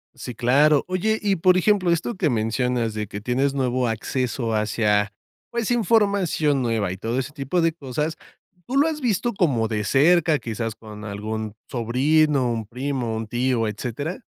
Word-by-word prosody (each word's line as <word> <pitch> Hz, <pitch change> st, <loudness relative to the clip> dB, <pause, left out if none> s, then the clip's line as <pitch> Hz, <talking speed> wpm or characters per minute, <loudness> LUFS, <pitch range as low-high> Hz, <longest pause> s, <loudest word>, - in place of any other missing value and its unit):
Sí, 125 Hz, -, -7 dB
claro. 140 Hz, +5 st, +4 dB
Oye, 215 Hz, +4 st, 0 dB
y, 200 Hz, -2 st, +1 dB
por 185 Hz, +2 st, +4 dB
ejemplo, 185 Hz, -1 st, +2 dB
esto 170 Hz, +8 st, 0 dB
que 180 Hz, -5 st, +1 dB
mencionas 115 Hz, 0 st, 0 dB
de 105 Hz, -1 st, -4 dB
que 100 Hz, +1 st, -7 dB
tienes 130 Hz, +5 st, 0 dB
nuevo 130 Hz, -2 st, 0 dB
acceso 115 Hz, +1 st, -2 dB
hacia, 105 Hz, -1 st, +1 dB, 0.4 s
pues, 235 Hz, -1 st, -1 dB
información 200 Hz, -, +2 dB
nueva 110 Hz, -6 st, 0 dB
y 95 Hz, -, -5 dB
todo 115 Hz, +5 st, -3 dB
ese 130 Hz, +2 st, -2 dB
tipo 145 Hz, +4 st, -1 dB
de 165 Hz, 0 st, +3 dB
cosas. 150 Hz, +1 st, -4 dB, 0.5 s
¿Tú 255 Hz, -, -3 dB
lo 285 Hz, +3 st, +4 dB
has 315 Hz, -2 st, -2 dB
visto 240 Hz, -2 st, 0 dB
como 130 Hz, -, +1 dB
de 105 Hz, -2 st, -2 dB
cerca, 155 Hz, -, +4 dB
quizás 115 Hz, -2 st, -4 dB
con 105 Hz, -1 st, -10 dB
algún 110 Hz, +1 st, -5 dB
sobrino, 135 Hz, +3 st, +2 dB
un 115 Hz, -2 st, -3 dB
primo, 125 Hz, -1 st, -3 dB
un 110 Hz, 0 st, -4 dB
tío, 120 Hz, 0 st, 0 dB
etcétera? 125 Hz, -, -5 dB
130 Hz, 165 wpm, -23 LUFS, 115-165 Hz, 0.5 s, claro